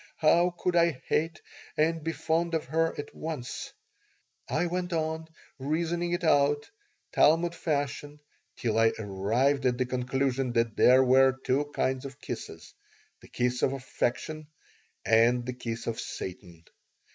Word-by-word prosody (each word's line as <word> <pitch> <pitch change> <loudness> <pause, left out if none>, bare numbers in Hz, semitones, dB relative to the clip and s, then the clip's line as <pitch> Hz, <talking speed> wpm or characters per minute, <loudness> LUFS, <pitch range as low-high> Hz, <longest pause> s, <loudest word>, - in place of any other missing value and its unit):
How 170 +3 +3
could 180 0 -1
I 170 -1 +4
hate 165 +2 0 0.4
and 160 +1 +1
be 165 - -1
fond 165 +1 0
of 160 - -1
her 165 +4 0
at 145 - -6
once? 155 -6 -5 0.8
I 175 - +1
went 180 +1 -2
on 160 0 -2 0.3
reasoning 170 +5 -1
it 175 +1 -2
out, 145 -2 +3 0.4
Talmud 165 +3 +4
fashion, 145 -2 -3 0.4
till 115 -2 0
I 115 0 +4
arrived 110 +8 0
at 125 -1 +1
the 130 - +1
conclusion 130 0 -1
that 115 -2 +1
there 130 +1 +6
were 130 +1 +5
two 140 +3 +2
kinds 130 -3 -1
of 135 0 -9
kisses: - - -7 0.5
the - - -16
kiss 125 0 -1
of 135 - +2
affection 135 +3 -3 0.6
and 120 +2 +4
the 125 - -3
kiss 115 -2 -5
of 115 -1 -3
Satan. 90 -3 -7
140 Hz, 145 wpm, -28 LUFS, 125-160 Hz, 0.8 s, there